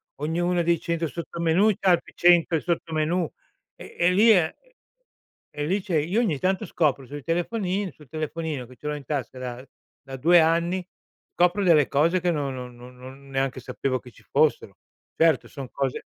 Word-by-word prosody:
ognuno 175 Hz, +4 st, 0 dB
dei 170 Hz, -1 st, +2 dB
100 170 Hz, 0 st, -2 dB
sottomenù 170 Hz, +5 st, +1 dB
c'ha 190 Hz, -, +3 dB
altri 175 Hz, -, 0 dB
100 170 Hz, -2 st, +4 dB
sottomenù, 165 Hz, 0 st, -1 dB, 0.5 s
e -, -, -12 dB
e 175 Hz, +1 st, +3 dB
lì 210 Hz, +5 st, +5 dB
è 175 Hz, -6 st, +3 dB
e -, -, -29 dB, 0.8 s
e 145 Hz, 0 st, -4 dB
lì 190 Hz, +5 st, 0 dB
c'è 180 Hz, -4 st, -3 dB
io 170 Hz, +9 st, 0 dB
ogni 175 Hz, -, 0 dB
tanto 190 Hz, +3 st, 0 dB
scopro 140 Hz, -5 st, 0 dB
sui 145 Hz, +2 st, -8 dB
telefonini 185 Hz, +3 st, -1 dB
sul 150 Hz, -4 st, -19 dB
telefonino 155 Hz, -3 st, -4 dB
che 130 Hz, -, -15 dB
ce 150 Hz, -, -8 dB
l'ho 150 Hz, -, -1 dB
in 145 Hz, -, -9 dB
tasca 130 Hz, -3 st, -4 dB
da 125 Hz, +1 st, -7 dB, 0.4 s
da 135 Hz, 0 st, -8 dB
2 170 Hz, +6 st, +5 dB
anni, 170 Hz, +3 st, +1 dB, 0.5 s
copro 180 Hz, +3 st, +2 dB
delle 160 Hz, -6 st, +5 dB
cose 165 Hz, +6 st, +2 dB
che 175 Hz, 0 st, +1 dB
non 145 Hz, -4 st, -2 dB
non 125 Hz, -1 st, -8 dB
non 125 Hz, +1 st, -13 dB
non 135 Hz, +2 st, -12 dB
neanche 135 Hz, -1 st, -1 dB
sapevo 130 Hz, +1 st, -2 dB
che 125 Hz, -, -14 dB
ci -, -, -21 dB
fossero. 140 Hz, -9 st, +1 dB, 0.4 s
Certo 165 Hz, -1 st, +3 dB
son 135 Hz, -4 st, -8 dB
cose 135 Hz, -2 st, -3 dB
160 Hz, 180 wpm, -25 LUFS, 135-175 Hz, 0.8 s, lì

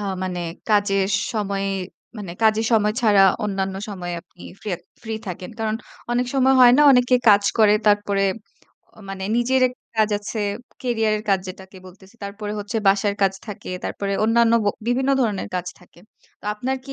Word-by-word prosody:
আ -, -, -5 dB, 0.2 s
মানে 180 Hz, -1 st, -3 dB, 0.3 s
কাজের 200 Hz, -2 st, +2 dB, 0.3 s
সময়ে 200 Hz, -2 st, -2 dB, 0.5 s
মানে 195 Hz, -4 st, -6 dB
কাজের 220 Hz, 0 st, +3 dB
সময় 210 Hz, -1 st, +3 dB
ছাড়া 210 Hz, -4 st, +5 dB, 0.2 s
অন্যান্য 195 Hz, -2 st, -2 dB
সময়ে 175 Hz, -4 st, -5 dB
আপনি 175 Hz, -, -19 dB, 0.2 s
ফ্রে 210 Hz, -, -4 dB, 0.3 s
ফ্রি 225 Hz, -1 st, -4 dB
থাকেন? 180 Hz, 0 st, -6 dB
কারণ 220 Hz, -1 st, -1 dB, 0.4 s
অনেক 245 Hz, +1 st, +1 dB
সময় 265 Hz, 0 st, +4 dB
হয় 245 Hz, -1 st, +8 dB
না? 295 Hz, -, +5 dB
অনেকে 250 Hz, 0 st, +4 dB
কাজ 205 Hz, 0 st, +6 dB, 0.2 s
করে। 215 Hz, -2 st, +6 dB
তারপরে 205 Hz, -1 st, +2 dB, 0.7 s
অ -, -, -23 dB
মানে 190 Hz, -1 st, -6 dB
নিজের 255 Hz, +2 st, +2 dB
একটা 250 Hz, -, -14 dB
কাজ 215 Hz, 0 st, +3 dB
আছে। 210 Hz, +2 st, -6 dB, 0.4 s
ক্যারিয়ার 225 Hz, -4 st, 0 dB
এর 210 Hz, -, -8 dB
কাজ 195 Hz, -, +3 dB
যেটাকে 190 Hz, +1 st, -10 dB
বলতেছি। 190 Hz, +4 st, -17 dB
তারপরে 205 Hz, +1 st, -6 dB
হচ্ছে 210 Hz, +3 st, -4 dB
বাসার 200 Hz, +1 st, +3 dB
কাজ 195 Hz, -1 st, +3 dB
থাকে। 210 Hz, -, -8 dB
তারপরে 200 Hz, -1 st, -3 dB
অন্যান্য 230 Hz, +1 st, +3 dB
ব -, -, +2 dB, 0.2 s
বিভিন্ন 260 Hz, +3 st, +1 dB
ধরনের 210 Hz, -5 st, -1 dB
কাজ 180 Hz, 0 st, -2 dB
থাকে। 175 Hz, -1 st, -21 dB, 0.4 s
তো -, -, -14 dB
আপনার 260 Hz, +5 st, -2 dB
কি 275 Hz, -, -8 dB
210 Hz, 175 wpm, -22 LUFS, 195-225 Hz, 0.7 s, হয়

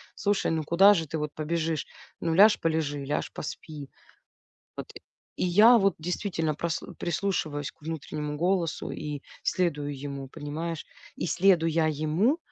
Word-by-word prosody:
"Слушай, 205 Hz, -1 st, 0 dB
ну 160 Hz, -1 st, 0 dB
куда 190 Hz, +7 st, +6 dB
же 165 Hz, -4 st, -1 dB
ты 160 Hz, +3 st, -3 dB
вот 150 Hz, -1 st, -3 dB
побежишь? 160 Hz, 0 st, -2 dB, 0.3 s
Ну 165 Hz, -, 0 dB
ляж 205 Hz, +3 st, +7 dB
полежи, 155 Hz, -3 st, -1 dB
ляж 145 Hz, +2 st, -2 dB
поспи". 150 Hz, -2 st, -7 dB, 0.9 s
Вот, -, -, -7 dB, 0.4 s
и -, -, -1 dB
я 215 Hz, +7 st, +7 dB
вот 195 Hz, -3 st, +3 dB
действительно 165 Hz, -2 st, -2 dB
прас 165 Hz, +1 st, -2 dB, 0.2 s
прислушиваюсь 160 Hz, -5 st, -2 dB
к -, -, -34 dB
внутреннему 150 Hz, -1 st, -4 dB
голосу 175 Hz, -1 st, 0 dB
и 150 Hz, -2 st, -5 dB, 0.2 s
следую 145 Hz, -6 st, -1 dB
ему, 140 Hz, -1 st, -6 dB
понимаешь. 155 Hz, +4 st, -5 dB, 0.3 s
И -, -, -2 dB
следуя 165 Hz, -3 st, +3 dB
ему, 155 Hz, -, +1 dB
160 Hz, 140 wpm, -27 LUFS, 150-180 Hz, 0.9 s, ляж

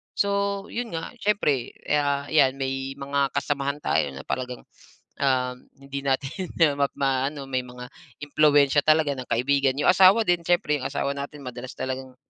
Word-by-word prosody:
So, 200 Hz, 0 st, 0 dB
'yon 235 Hz, -1 st, -4 dB
nga, 165 Hz, -, -5 dB
siyempre 175 Hz, -, 0 dB
ya 145 Hz, -1 st, 0 dB
'yan 135 Hz, -4 st, +4 dB
may 135 Hz, 0 st, -3 dB
mga 140 Hz, 0 st, 0 dB
kasamahan 140 Hz, 0 st, -1 dB
tayo -, -, +1 dB
na 70 Hz, -, -8 dB
talagang, 125 Hz, -1 st, -4 dB, 0.6 s
ah, 130 Hz, -2 st, +2 dB, 0.3 s
hindi 140 Hz, 0 st, -6 dB
natin 140 Hz, +7 st, -1 dB, 0.3 s
ma 140 Hz, -, +3 dB
ma-aano. 135 Hz, +1 st, -1 dB
May 130 Hz, -1 st, 0 dB
mga 125 Hz, 0 st, -10 dB, 0.4 s
impluwensiya 145 Hz, -1 st, +4 dB
talaga 155 Hz, -1 st, +4 dB
ng 130 Hz, -, -7 dB
kaibigan. 135 Hz, +2 st, +2 dB
Yong 145 Hz, -, +3 dB
asawa 190 Hz, +4 st, +6 dB
din 175 Hz, -1 st, +2 dB
siyempre, 150 Hz, -4 st, +2 dB
yong 130 Hz, -, -3 dB
asawa 140 Hz, 0 st, -1 dB
natin, 140 Hz, 0 st, -7 dB
madalas 125 Hz, 0 st, -7 dB
talagang 130 Hz, 0 st, -5 dB
140 Hz, 155 wpm, -25 LUFS, 130-150 Hz, 0.6 s, asawa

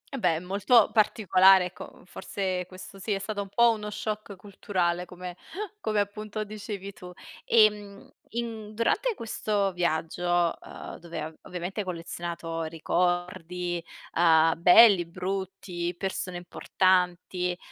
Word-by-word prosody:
Eh -, -, -4 dB
beh, 165 Hz, -5 st, +2 dB
molto 200 Hz, +5 st, +3 dB
particolare 195 Hz, -3 st, +5 dB
ecco, 180 Hz, -, -10 dB
forse 185 Hz, -1 st, -3 dB
questo 185 Hz, +1 st, -11 dB
sì, 205 Hz, +2 st, -2 dB
è -, -, 0 dB
stato 205 Hz, +1 st, -4 dB
un 195 Hz, -, -7 dB
po' 235 Hz, +2 st, +5 dB
uno 210 Hz, -1 st, -4 dB
shock 210 Hz, -1 st, -5 dB
culturale 180 Hz, -3 st, -2 dB
come 180 Hz, 0 st, -8 dB, 0.5 s
come 215 Hz, -1 st, +1 dB
appunto 215 Hz, +1 st, -4 dB
dicevi 205 Hz, -2 st, -7 dB
tu. 180 Hz, 0 st, -11 dB, 0.3 s
Ehm, 210 Hz, -3 st, +2 dB, 0.2 s
in 220 Hz, -2 st, -5 dB
durante 425 Hz, -, +1 dB
questo 210 Hz, -3 st, -1 dB
viaggio, 175 Hz, 0 st, 0 dB
uhm, -, -, -9 dB
dove 170 Hz, 0 st, -7 dB
av 155 Hz, +1 st, -6 dB
ovviamente 180 Hz, +3 st, -6 dB
hai 200 Hz, -, -2 dB
collezionato 170 Hz, -1 st, -5 dB
ricordi, 175 Hz, +1 st, -1 dB, 0.3 s
uhm, 165 Hz, -1 st, +5 dB
belli, 185 Hz, -1 st, +8 dB
brutti, 180 Hz, -1 st, -4 dB
persone 190 Hz, -2 st, -3 dB
importanti, 180 Hz, 0 st, 0 dB
185 Hz, 125 wpm, -27 LUFS, 175-210 Hz, 0.5 s, belli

